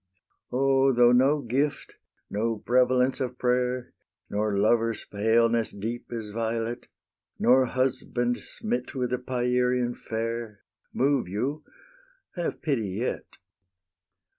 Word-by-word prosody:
O, 135 +1 +3
though 120 -1 +5
no 135 +4 +4
gift, 140 +4 -2 0.3
no 110 +2 -1
"prevalence 125 +3 +2
of 125 -1 -3
prayer," 125 0 0 0.4
Nor 105 0 0
lovers' 115 +2 +2
paleness 115 +2 +2
deep 115 +4 -5
as 110 -3 -5
violet, 115 +2 -3 0.5
Nor 130 +1 +4
husband, 120 -1 -1
smit 230 -7 -4
with 125 -1 -1
a 125 - 0
Pierian 125 -1 0
fair, 115 -2 -4 0.3
Move 135 -5 +1
you, 130 +11 -3 0.7
have 175 -2 -3
pity 130 -10 0
yet! 120 +3 -4
120 Hz, 110 wpm, -27 LUFS, 115-130 Hz, 0.7 s, though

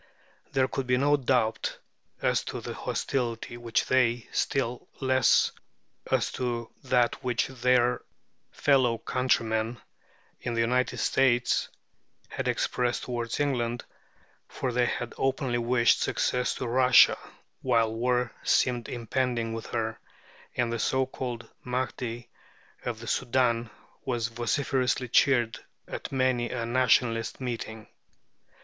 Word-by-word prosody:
There 130 -1 +2
could 130 -1 -3
be 125 0 +3
no 145 +3 +4
doubt 120 -5 0 0.5
as - - +2
to - - -4
the - - -6
hostility 120 -3 -2
which 120 -1 -1
they, 120 -2 +2
still 125 -3 -1
less 130 -1 +4 0.6
as - - +1
to 120 -2 -3
that 125 -2 +2
which 125 -2 +1
their 125 -1 +2 0.5
fellow 130 -5 +3
countrymen 115 -2 0 0.6
in 120 - -3
the 115 - +2
United 125 +2 +1
States, 125 -2 +2 0.6
had - - -4
expressed 125 -1 0
toward 120 -2 -3
England, 120 -5 -1 0.6
for 130 - -3
they 120 0 +2
had 120 -1 -3
openly 130 -2 0
wished 120 0 +3
success 125 0 0
to 125 - -4
Russia 125 +1 +6 0.5
while 115 -3 +2
war 125 +1 0
seemed 120 -2 +1
impending 120 -1 -1
with 115 0 -6
her, 110 0 -2 0.6
and 120 -1 0
the 115 - -2
so 130 +3 +1
called 125 -3 -5 0.2
Mahdi 125 -1 -3 0.6
of 120 -3 -3
the 115 - -8
Soudan 120 -2 +1 0.3
was 120 -4 -1
vociferously 125 +1 0
cheered 120 -2 +3 0.3
at - - -6
many 130 -2 +1
a 115 -2 -3
Nationalist 115 -2 +2
meeting. 115 -3 -5
120 Hz, 120 wpm, -28 LUFS, 115-130 Hz, 0.6 s, Russia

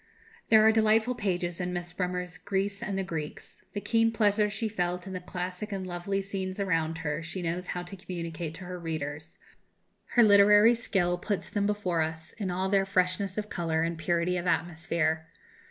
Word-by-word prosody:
There 220 -1 +7
are 220 - +8
delightful 220 +2 +3
pages 180 -6 -2
in 180 0 -2
Miss 175 0 -4
Bremer's 180 -1 -3
"Greece 195 +2 -2
and 200 -2 -2
the 195 - 0
Greeks"; 160 -4 -6
the 205 - -2
keen 225 +1 +3
pleasure 210 -1 +3
she 215 +2 -2
felt 180 -3 -2
in 190 - -6
the 185 - -3
classic 180 +3 -5
and 195 -2 -3
lovely 185 +2 -2
scenes 190 -1 -4
around 165 -4 0
her 150 +2 -1
she 175 +3 -5
knows 175 +2 -2
how 175 - -3
to 180 +3 -9
communicate 170 -3 -5
to 185 - -9
her 180 0 -6
readers; 155 -2 -5 0.8
her 240 - +8
literary 210 +2 +7
skill 185 -7 0
puts 200 0 -3
them 205 -1 +1
before 190 -5 0
us 160 0 -4
in 200 -3 -1
all 185 +2 0
their 195 0 +3
freshness 185 +1 +1
of 210 0 -3
colour 165 -2 0
and 165 0 -2
purity 170 +2 +1
of 175 +1 -3
atmosphere. 160 -2 0
180 Hz, 185 wpm, -29 LUFS, 170-200 Hz, 0.8 s, are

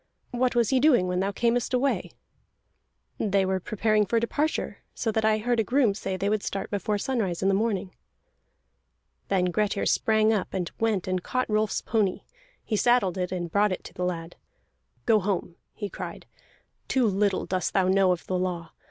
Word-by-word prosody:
"What 250 0 0
was 235 -3 +3
he 260 - +4
doing 250 -10 +4
when 180 0 0
thou 195 +2 0
earnest 240 +2 +2
away?" 265 +2 0 1.1
"They 195 -2 +2
were 190 0 0
preparing 215 +2 +1
for 230 - +2
departure, 290 +7 -1 0.2
so 225 - -1
that 220 0 0
I 215 0 +3
heard 235 +2 0
a - - +3
groom 245 -2 +2
say 190 -2 -4
they 195 +2 -1
would 210 0 +1
start 195 -1 -4
before 205 +1 -1
sunrise 200 -7 -1
in 195 - +3
the - - +3
morning." 200 -2 -1 1.3
Then 180 -2 +1
Grettir 205 +1 0
sprang 220 0 +3
up, 200 -4 -2
and 180 -2 -2
went 215 -5 0
and 185 -1 0
caught 255 +7 -1
Rolf's 215 0 +1
pony; 210 -5 0 0.4
he 220 - -1
saddled 225 -5 +3
it, 180 0 -2
and 175 -2 -3
brought 205 +2 +3
it 185 - -4
to - - -11
the 180 - -4
lad. 170 -2 -4 0.7
"Go 220 -2 +5
home!" 185 -3 -2 0.2
he 205 - -5
cried. - - -7 0.6
"Too 260 -2 +2
little 200 -1 +1
dost 185 -1 -2
thou 190 -2 +3
know 190 0 +4
of 180 - -2
the 185 -1 -1
law. 175 -2 -3
205 Hz, 185 wpm, -26 LUFS, 185-225 Hz, 1.3 s, Go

